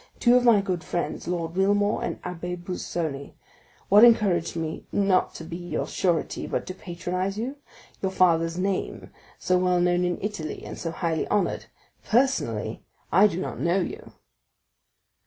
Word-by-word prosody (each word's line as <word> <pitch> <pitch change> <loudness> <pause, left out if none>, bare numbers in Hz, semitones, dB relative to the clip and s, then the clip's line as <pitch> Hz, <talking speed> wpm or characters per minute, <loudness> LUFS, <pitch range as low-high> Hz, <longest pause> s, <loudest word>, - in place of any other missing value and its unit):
—two 240 0 +5
of 250 - +4
my 230 -4 +6
good 185 -3 -3
friends, 175 - -3
Lord 170 -1 -3
Wilmore 205 +2 +2
and - - -2
the - - -6
Abbé 180 0 -5
Busoni. 170 -5 -4 0.5
What 205 +3 +7
encouraged 200 -9 +4
me 160 -1 -4
not 195 -2 +2
to - - -7
become 170 +1 -7
your - - -2
surety, 175 -3 -1
but - - -2
to 185 - -5
patronize 185 +2 -4
you?—your 245 -5 -6
father's 165 -2 +2
name, 195 +1 -2 0.3
so 180 0 +1
well 180 -1 +2
known 175 0 +2
in 175 -1 0
Italy 200 -7 -5
and - - -7
so 165 - -4
highly 165 -1 -2
honored. 200 -3 0 0.4
Personally, 165 - 0 0.3
I 195 +4 +6
do 185 -3 -4
not - - -4
know 175 +3 +2
you." 180 - -5
180 Hz, 155 wpm, -25 LUFS, 170-200 Hz, 0.5 s, What